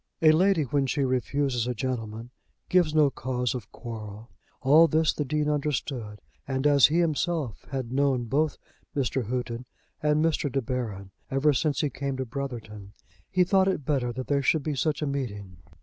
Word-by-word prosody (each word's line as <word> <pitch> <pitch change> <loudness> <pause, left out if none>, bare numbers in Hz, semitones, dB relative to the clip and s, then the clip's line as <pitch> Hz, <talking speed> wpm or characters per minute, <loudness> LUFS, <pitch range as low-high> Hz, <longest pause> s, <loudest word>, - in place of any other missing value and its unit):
A 155 - +8
lady 180 +1 +3
when 140 0 0
she 140 +1 0
refuses 130 -1 0
a 125 - -2
gentleman 115 -2 -4 0.4
gives 175 -4 +3
no 150 -3 +5
cause 125 -1 -2
of 120 -5 -7
quarrel. 110 -2 -8 0.3
All 150 +5 +6
this 160 +1 +2
the 150 - -2
Dean 150 +2 -1
understood; 135 -7 -2 0.3
and 135 0 -2
as 145 -2 +7
he 155 - 0
himself 160 - -1
had 130 -4 -4
known 135 -2 +2
both 145 +6 0 0.4
Mr. 130 -2 0
Houghton 120 0 -3 0.3
and 150 +1 +2
Mr. 150 -3 0
De 135 - +1
Baron 110 -6 -4 0.2
ever 140 +2 +3
since 145 0 0
he 145 - 0
came 135 +1 -3
to 130 - -2
Brotherton, 115 -6 -6 0.4
he 185 - +3
thought 190 +1 +3
it 185 -8 -1
better 135 -5 0
that 130 +2 -5
there 140 -1 +1
should 145 +2 +2
be 155 - -1
such 145 +2 0
a - - +1
meeting. 105 - -4
135 Hz, 180 wpm, -27 LUFS, 120-150 Hz, 0.4 s, A